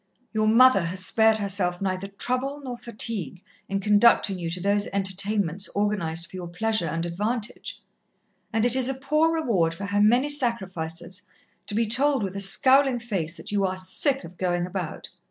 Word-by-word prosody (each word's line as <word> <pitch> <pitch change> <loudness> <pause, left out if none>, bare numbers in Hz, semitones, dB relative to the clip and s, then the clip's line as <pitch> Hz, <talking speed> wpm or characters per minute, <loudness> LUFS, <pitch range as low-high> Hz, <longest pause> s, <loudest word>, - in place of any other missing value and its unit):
Your 215 0 +1
mother 230 -4 +5
has 185 +2 -3
spared 220 -1 +3
herself 195 -4 -1
neither 190 0 -3
trouble 255 +8 -2
nor 250 -2 -5
fatigue 215 - -3 0.3
in 195 0 -1
conducting 205 -1 +3
you 170 -1 -4
to 175 +2 -4
those 200 +2 0
entertainments 195 -1 -2
organized 180 -5 0
for 185 - -8
your 180 -1 -6
pleasure 215 +1 -1
and 165 +2 -3
advantage, 210 +6 -4 0.7
and 225 0 +1
it 245 0 +4
is 260 -1 0
a 270 - -2
poor 305 +4 +1
reward 210 - 0
for 200 - -6
her 200 +1 0
many 240 +6 +4
sacrifices 190 - -1 0.5
to 205 - -4
be 230 +1 +2
told 265 +3 +1
with 195 -1 -4
a - - -3
scowling 260 +6 +4
face 190 -8 -3
that - - -8
you 205 -1 0
are 185 -1 -1
'sick 265 +9 +1
of 175 +2 -12
going 175 -1 0
about.' 180 -3 -6
200 Hz, 175 wpm, -25 LUFS, 185-235 Hz, 0.7 s, mother